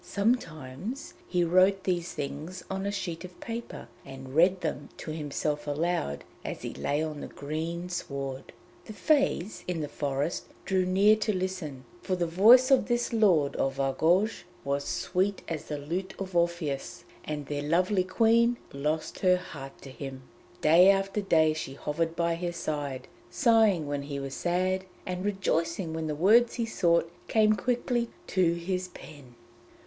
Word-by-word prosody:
Sometimes 200 - -2
he 180 -1 +1
wrote 185 +3 +4
these 175 -2 -1
things 155 +6 -5
on 195 +1 -2
a - - 0
sheet 180 -4 -4
of 180 -1 -11
paper 230 - -6 0.2
and 135 -1 -10
read 180 +4 +4
them 150 -3 -3
to 155 - -6
himself 150 -1 -3
aloud 145 - -1 0.2
as - - -6
he - - -4
lay 145 +2 -1
on 155 -2 -4
the - - -5
green 160 +4 -4
sward. 140 -6 -5 0.3
The 215 - -8
Fées 275 - +1
in 175 -3 -2
the 150 - -2
forest 145 +2 -2 0.2
drew 185 -1 +1
near 200 +3 +5
to 215 0 0
listen, 180 -8 -4 0.2
for 185 - -1
the 175 -1 0
voice 230 - +6
of 265 - +5
this 240 -1 0
lord 180 -11 +3
of 135 0 -1
Argouges 165 +10 +2 0.2
was 140 0 -1
sweet 190 +2 -1
as 160 -3 -4
the 150 - -4
lute 175 +7 -4
of 190 -2 -6
Orpheus, 170 -5 -1 0.2
and 150 -1 -4
their 145 0 -3
lovely 180 +6 +2
Queen 230 +5 +3 0.2
lost 150 +3 -2
her 180 -1 +4
heart 140 -6 -9
to 135 - -9
him. 130 -1 -7 0.4
Day 170 +5 +7
after 195 +1 +2
day 160 -5 +3
she 155 -4 -5
hovered 165 +3 -2
by 170 0 +1
his 175 +1 -3
side, 145 -5 -3 0.2
sighing 220 - +4
when 145 0 -2
he 140 0 -5
was 135 0 -5
sad, 185 +3 0 0.2
and 180 0 -3
rejoicing 170 -4 -1
when 160 -1 -3
the 150 - -2
words 220 +9 +5
he 235 - -1
sought 170 -6 +2 0.2
came 215 -1 +4
quickly 240 +2 0 0.2
to 175 -3 +2
his 180 +2 -2
pen. 140 -8 -13
170 Hz, 165 wpm, -28 LUFS, 150-195 Hz, 0.4 s, Day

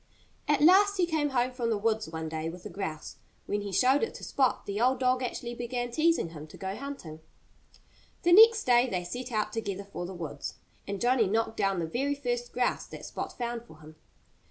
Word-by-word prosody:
At 295 -1 +2
last 400 +4 +6
he 360 - +3
came 315 -3 0
home 255 -1 +1
from 245 -2 -2
the 220 - +1
woods 220 -2 0
one 160 0 -5
day 160 0 -3
with 175 +1 -10
a - - -6
grouse. 160 -6 -5 0.3
When 205 0 -1
he 200 -1 -5
showed 260 +7 +4
it 455 - -2
to - - -10
Spot 265 -2 +1
the 205 +2 -3
old 255 +1 +3
dog 255 0 +2
actually 240 -1 -4
began 245 0 -3
teasing 315 - +2
him 155 -2 -9
to - - -13
go 190 0 -4
hunting. 265 - -7 1.0
The 345 - +5
next 445 +2 +8
day 245 0 +4
they 180 -4 -2
set 245 +8 -6
out 215 -1 -1
together 200 -3 -3
for 195 -3 -6
the 190 - -7
woods. 150 -5 -6 0.3
And 200 0 -3
Johnnie 245 -2 +3
knocked 220 +1 0
down 195 -1 +1
the 170 - -1
very 270 - -1
first 245 -3 -3
grouse 250 0 0
that - - -9
Spot - - -5
found 240 -1 -3
for 220 - -15
him. 155 +1 -13
235 Hz, 215 wpm, -29 LUFS, 190-260 Hz, 1.0 s, next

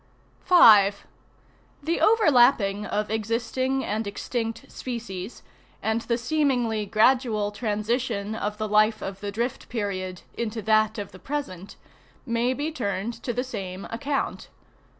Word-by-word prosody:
5. 210 - +6 0.8
The 330 +3 -1
overlapping 245 - +4
of 210 0 -2
existing 240 +5 -1
and 215 +1 -2
extinct, 225 +2 -4
species, 230 -5 -6 0.4
and 220 +1 -1
the 235 0 -1
seemingly 245 -5 0
gradual 220 -1 +2
transition 215 0 -2
of 210 -1 -3
the 215 0 -2
life 215 +1 +3
of 195 0 -5
the 205 0 -4
drift 235 +4 -3
period 185 -5 -4
into 225 -1 -4
that 215 +1 +3
of 205 -2 -5
the 185 - -13
present, 200 -10 -5 0.5
may 235 0 +1
be 295 +4 -2
turned 210 -5 -3
to 245 - -2
the 245 +2 -1
same 195 -7 -6
account. 275 +4 -3
220 Hz, 130 wpm, -25 LUFS, 205-250 Hz, 0.8 s, 5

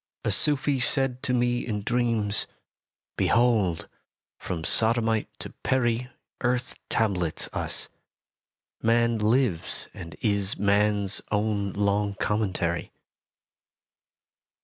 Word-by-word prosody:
SELF - - -3
A - - +2
Sufi 145 -2 +3
said 130 0 +2
to - - -2
me 120 0 +1
in 105 -3 -3
dreams: 115 -2 0 0.7
Behold! 110 -8 +2 0.5
from 85 -3 -5
Sodomite 115 +2 +2
to - - -8
Peri 125 -1 0 0.3
Earth 125 0 0 0.2
tablets 95 -7 0
us: - - -1 0.9
man 115 0 +2
lives 110 -5 0
and 85 -3 -9
is 100 -2 +1
Man's 100 0 +2
own 105 -2 0
long 100 0 0
commentary. 95 -5 -1
110 Hz, 100 wpm, -26 LUFS, 100-120 Hz, 0.9 s, Sufi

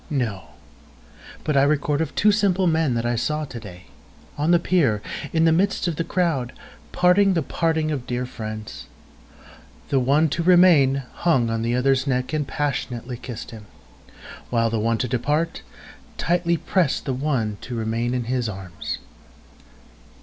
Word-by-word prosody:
—No; 120 - -2 1.0
But 150 - -1
I 135 - +5
record 145 +1 +1
of 160 -2 -3
two 210 - +4
simple 195 -3 +2
men 160 -7 +2
I 120 +1 0
saw 150 +6 -1
to 125 -4 -8
day, 90 -4 -11 0.5
on 150 +3 -1
the 175 - +6
pier, 165 - +2 0.3
in 165 0 +2
the 165 - +5
midst 185 +3 +1
of 170 - -1
the 165 - 0
crowd, 165 -10 -1 0.4
parting 185 +2 +4
the 165 - +1
parting 160 0 0
of 130 -5 -4
dear 125 +1 -2
friends; 110 -3 -7 1.0
The 135 - +2
one 140 +5 +3
to 170 - -2
remain 165 -7 +5
hung 130 -10 +1
on 115 0 -1
the 120 +1 0
other's 135 +1 +2
neck, 125 +2 -1
and 150 -2 -1
passionately 130 -4 -3
kiss'd 120 -2 -8
him, 110 -2 -11 0.8
While 115 -2 +1
the 115 - 0
one 115 +1 +1
to 125 - -1
depart, 150 +8 -1 0.6
tightly 170 0 +1
prest 175 -4 0
the 135 - -1
one 125 -7 -1
to 125 - -6
remain 115 +2 -1
in 125 - -1
his 120 -1 -1
arms. 95 -4 -6
135 Hz, 160 wpm, -23 LUFS, 120-165 Hz, 1.0 s, the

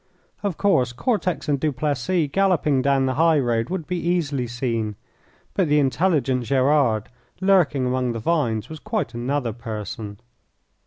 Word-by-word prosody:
Of 200 -5 -2
course, 130 -12 +2
Cortex 185 - -1
and 145 -2 +1
Duplessis 150 +3 0
galloping 175 -8 +2
down 135 0 +2
the 130 - 0
high 165 -1 +5
road 120 -4 0
would 180 -3 -3
be 180 +1 -2
easily 155 -7 -1
seen, 115 -3 -2 0.6
but 190 -4 +1
the 150 0 +3
intelligent 140 -3 +1
Gerard 130 -4 +2 0.3
lurking 180 -9 +3
among 125 -1 0
the 115 - -4
vines 115 -6 0
was 160 -1 -8
quite 215 - -3
another 120 0 -2
person. 105 -2 -6
140 Hz, 145 wpm, -23 LUFS, 120-170 Hz, 0.6 s, high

